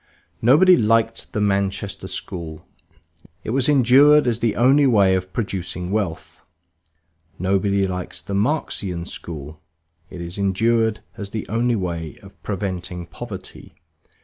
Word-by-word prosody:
Nobody 170 Hz, +10 st, +6 dB
liked 115 Hz, +1 st, +1 dB
the -, -, -2 dB
Manchester 100 Hz, -1 st, -1 dB
School; 80 Hz, -3 st, -6 dB, 0.8 s
it -, -, -4 dB
was 130 Hz, +2 st, +1 dB
endured 145 Hz, +2 st, +6 dB
as 120 Hz, -2 st, +1 dB
the 115 Hz, -3 st, 0 dB
only 135 Hz, +4 st, +4 dB
way 100 Hz, -6 st, +4 dB
of 95 Hz, 0 st, -2 dB
producing 90 Hz, -4 st, -4 dB
wealth. 100 Hz, -6 st, -3 dB, 1.0 s
Nobody 100 Hz, +2 st, +1 dB
likes 90 Hz, -2 st, -5 dB
the 100 Hz, -, -7 dB
Marxian 100 Hz, -, -1 dB
school; 75 Hz, -3 st, -8 dB, 0.5 s
it 90 Hz, -, -9 dB
is 85 Hz, +3 st, -6 dB
endured 110 Hz, +3 st, +1 dB, 0.2 s
as 100 Hz, -1 st, -6 dB
the 110 Hz, 0 st, -5 dB
only 120 Hz, +2 st, +1 dB
way 85 Hz, -5 st, -4 dB
of -, -, -16 dB
preventing 90 Hz, -3 st, -4 dB
poverty. -, -, -10 dB
100 Hz, 125 wpm, -21 LUFS, 90-115 Hz, 1.0 s, Nobody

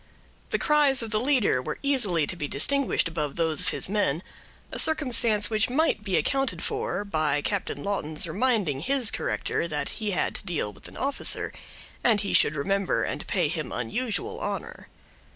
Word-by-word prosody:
The -, -, 0 dB
cries 290 Hz, -5 st, +3 dB
of 225 Hz, -, -6 dB
the 215 Hz, -, +3 dB
leader 250 Hz, -, +2 dB
were -, -, -5 dB
easily 215 Hz, -, +3 dB
to 180 Hz, -, -3 dB
be 150 Hz, -4 st, -4 dB
distinguished 275 Hz, -, +2 dB
above 150 Hz, -4 st, -3 dB
those 165 Hz, 0 st, +1 dB
of 180 Hz, -, -1 dB
his -, -, -1 dB
men; 185 Hz, -5 st, 0 dB, 0.5 s
a -, -, -1 dB
circumstance 240 Hz, -9 st, +3 dB
which 215 Hz, +1 st, +2 dB
might 270 Hz, -5 st, +1 dB
be 195 Hz, -4 st, 0 dB
accounted 270 Hz, -1 st, 0 dB
for, 435 Hz, -, -2 dB
by 155 Hz, -6 st, 0 dB
Captain 200 Hz, -2 st, -2 dB
Lawton's 160 Hz, -7 st, 0 dB
reminding 205 Hz, -, 0 dB
his 255 Hz, -, +2 dB
corrector 170 Hz, -, -2 dB
that 150 Hz, -3 st, -2 dB
he 215 Hz, -2 st, -4 dB
had 190 Hz, -, 0 dB
to -, -, -5 dB
deal 165 Hz, -, -2 dB
with 100 Hz, -, -13 dB
an -, -, -13 dB
officer, 275 Hz, +1 st, -1 dB, 0.5 s
and 220 Hz, -4 st, +4 dB
he 200 Hz, -, -2 dB
should 150 Hz, -, +5 dB
remember 195 Hz, +6 st, 0 dB
and -, -, -4 dB
pay 180 Hz, -5 st, +1 dB
him 155 Hz, -4 st, -4 dB
unusual 210 Hz, -, -3 dB
honor. -, -, -5 dB
205 Hz, 175 wpm, -26 LUFS, 160-255 Hz, 0.5 s, should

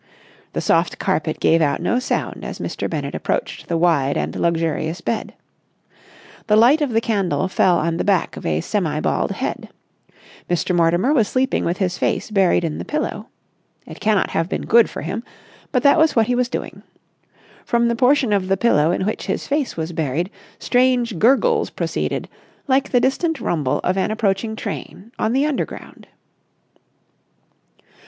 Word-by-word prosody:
The -, -, -2 dB
soft -, -, +1 dB
carpet -, -, -1 dB
gave 165 Hz, +1 st, +3 dB
out 145 Hz, -2 st, +1 dB
no 245 Hz, -, +1 dB
sound 255 Hz, -, -3 dB
as -, -, -6 dB
Mr. -, -, -4 dB
Bennett -, -, -4 dB
approached -, -, -3 dB
the 170 Hz, -, 0 dB
wide 160 Hz, -5 st, +2 dB
and -, -, -3 dB
luxurious 165 Hz, 0 st, -1 dB
bed. 225 Hz, -, -3 dB, 1.1 s
The 210 Hz, -, +4 dB
light 245 Hz, +8 st, +5 dB
of 290 Hz, -, +1 dB
the 225 Hz, -1 st, +1 dB
candle 195 Hz, -4 st, 0 dB
fell 185 Hz, -1 st, +3 dB
on 165 Hz, +1 st, -1 dB
the -, -, -1 dB
back 195 Hz, -4 st, +1 dB
of -, -, -9 dB
a 80 Hz, 0 st, 0 dB
semi 160 Hz, -, -1 dB
bald -, -, 0 dB
head. -, -, -4 dB, 0.8 s
Mr. 175 Hz, +1 st, 0 dB
Mortimer 175 Hz, -, +3 dB
was 230 Hz, -8 st, +3 dB
sleeping 260 Hz, +2 st, 0 dB
with 170 Hz, +2 st, -1 dB
his 180 Hz, -3 st, -1 dB
face -, -, -1 dB
buried 190 Hz, -4 st, +3 dB
in 160 Hz, -2 st, -3 dB
the -, -, -4 dB
pillow. 300 Hz, +1 st, -3 dB, 0.6 s
It -, -, -11 dB
cannot 210 Hz, -2 st, +1 dB
have 165 Hz, +2 st, -1 dB
been -, -, -3 dB
good 230 Hz, 0 st, +5 dB
for -, -, -7 dB
him, 195 Hz, +8 st, -4 dB, 0.5 s
but 250 Hz, -3 st, +1 dB
that 285 Hz, +3 st, +5 dB
was 315 Hz, 0 st, +3 dB
what 225 Hz, -2 st, +4 dB
he 245 Hz, -, 0 dB
was 245 Hz, 0 st, 0 dB
doing. -, -, -5 dB, 0.8 s
From 235 Hz, 0 st, +1 dB
the 235 Hz, -, +1 dB
portion 250 Hz, -2 st, +3 dB
of 195 Hz, -2 st, 0 dB
the 195 Hz, 0 st, +1 dB
pillow 160 Hz, -8 st, +3 dB
in 180 Hz, +2 st, 0 dB
which 215 Hz, -, -3 dB
his -, -, -2 dB
face 285 Hz, -, -1 dB
was 160 Hz, +1 st, -3 dB
buried 160 Hz, +5 st, -2 dB, 0.3 s
strange 245 Hz, -5 st, +1 dB
gurgles 275 Hz, -, +3 dB
proceeded, -, -, -3 dB, 0.4 s
like 265 Hz, 0 st, +2 dB
the 245 Hz, -, +3 dB
distant 280 Hz, +5 st, 0 dB
rumble 145 Hz, -6 st, 0 dB
of 185 Hz, +2 st, 0 dB
an 190 Hz, -, 0 dB
approaching 220 Hz, 0 st, -1 dB
train 205 Hz, 0 st, -7 dB
on 220 Hz, -, +1 dB
the 270 Hz, +4 st, +2 dB
Underground. 300 Hz, -3 st, -5 dB
210 Hz, 175 wpm, -20 LUFS, 170-250 Hz, 1.1 s, light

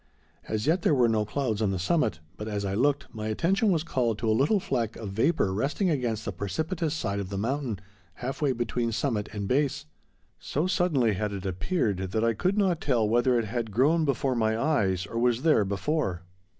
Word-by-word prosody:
As 110 Hz, +1 st, -2 dB
yet 165 Hz, +4 st, +2 dB
there 155 Hz, -, +3 dB
were 125 Hz, -3 st, +4 dB
no 110 Hz, -2 st, +1 dB
clouds 115 Hz, -2 st, -2 dB
on 105 Hz, -, +2 dB
the 95 Hz, -, -1 dB
summit, 100 Hz, -, 0 dB
but, 105 Hz, -, -6 dB
as 100 Hz, -2 st, -2 dB
I 95 Hz, -, -2 dB
looked, 140 Hz, +6 st, +1 dB
my 110 Hz, -1 st, -4 dB
attention 190 Hz, -, +1 dB
was 160 Hz, -4 st, +1 dB
called 120 Hz, -9 st, 0 dB
to 115 Hz, -, -3 dB
a 110 Hz, -, +4 dB
little 145 Hz, -, +3 dB
fleck 115 Hz, -, -2 dB
of 105 Hz, -4 st, -6 dB
vapor 110 Hz, -, +1 dB
resting 150 Hz, -, 0 dB
against 120 Hz, -7 st, -1 dB
the -, -, -2 dB
precipitous 155 Hz, -, -2 dB
side 100 Hz, -9 st, -2 dB
of 95 Hz, -2 st, -4 dB
the 100 Hz, -, -4 dB
mountain, 120 Hz, +1 st, -1 dB, 0.4 s
half 130 Hz, +7 st, -5 dB
way 145 Hz, -3 st, +3 dB
between 120 Hz, -1 st, -1 dB
summit 110 Hz, -3 st, -1 dB
and 100 Hz, -2 st, -4 dB
base. 140 Hz, +3 st, 0 dB, 0.5 s
So 150 Hz, +5 st, -1 dB
suddenly 165 Hz, -, +2 dB
had 105 Hz, +1 st, -2 dB
it 100 Hz, -1 st, -6 dB
appeared 100 Hz, -, 0 dB
that 95 Hz, +4 st, -2 dB
I 115 Hz, 0 st, +3 dB
could 185 Hz, -, 0 dB
not 185 Hz, -5 st, +2 dB
tell 120 Hz, -6 st, +2 dB
whether 120 Hz, +3 st, +3 dB
it 115 Hz, -, 0 dB
had 115 Hz, +1 st, -3 dB
grown 145 Hz, +10 st, +3 dB
before 140 Hz, -2 st, 0 dB
my 110 Hz, -2 st, +1 dB
eyes 100 Hz, -, +1 dB
or 115 Hz, +3 st, -4 dB
was 120 Hz, +1 st, +2 dB
there 155 Hz, -10 st, +4 dB
before. 100 Hz, -, -1 dB
115 Hz, 210 wpm, -27 LUFS, 105-145 Hz, 0.5 s, were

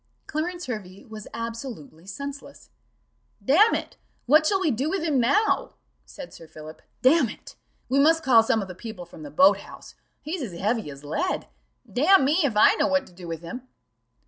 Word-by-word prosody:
Clarence 350 Hz, +3 st, -4 dB
Hervey 200 Hz, -2 st, -7 dB
was 220 Hz, -3 st, -10 dB
absolutely 230 Hz, -, -7 dB
senseless. 280 Hz, +7 st, -9 dB, 0.7 s
"Damn 390 Hz, -, +5 dB
it, -, -, -6 dB, 0.3 s
what 305 Hz, +4 st, +5 dB
shall 390 Hz, +2 st, +2 dB
we 350 Hz, -6 st, +1 dB
do 265 Hz, +6 st, -1 dB
with 380 Hz, -1 st, -2 dB
him 300 Hz, -5 st, +1 dB
now?" 420 Hz, -, +1 dB, 0.3 s
said 280 Hz, -3 st, -11 dB
Sir 165 Hz, -, -13 dB
Philip: 155 Hz, 0 st, -12 dB, 0.2 s
"Damn 265 Hz, -1 st, +4 dB
it, -, -, -12 dB, 0.3 s
we 270 Hz, +2 st, +1 dB
must 320 Hz, +3 st, +4 dB
call 240 Hz, -4 st, +6 dB
some 225 Hz, -1 st, 0 dB
of -, -, -8 dB
the 185 Hz, -, -8 dB
people 185 Hz, -2 st, -9 dB
from 175 Hz, -, -14 dB
the 300 Hz, -, -8 dB
boat 280 Hz, +1 st, +5 dB
house -, -, -13 dB, 0.3 s
he's 320 Hz, +3 st, -4 dB
as 185 Hz, -10 st, -6 dB
heavy 215 Hz, -2 st, -1 dB
as 140 Hz, 0 st, -11 dB
lead: 160 Hz, -, -2 dB, 0.4 s
damn 310 Hz, +4 st, +4 dB
me, 300 Hz, +6 st, +2 dB
if 240 Hz, -7 st, 0 dB
I 215 Hz, -, +7 dB
know -, -, +2 dB
what 280 Hz, 0 st, +1 dB
to -, -, -18 dB
do 175 Hz, 0 st, -11 dB
with 165 Hz, 0 st, -6 dB
him." 250 Hz, +10 st, -8 dB
255 Hz, 190 wpm, -25 LUFS, 200-305 Hz, 0.7 s, I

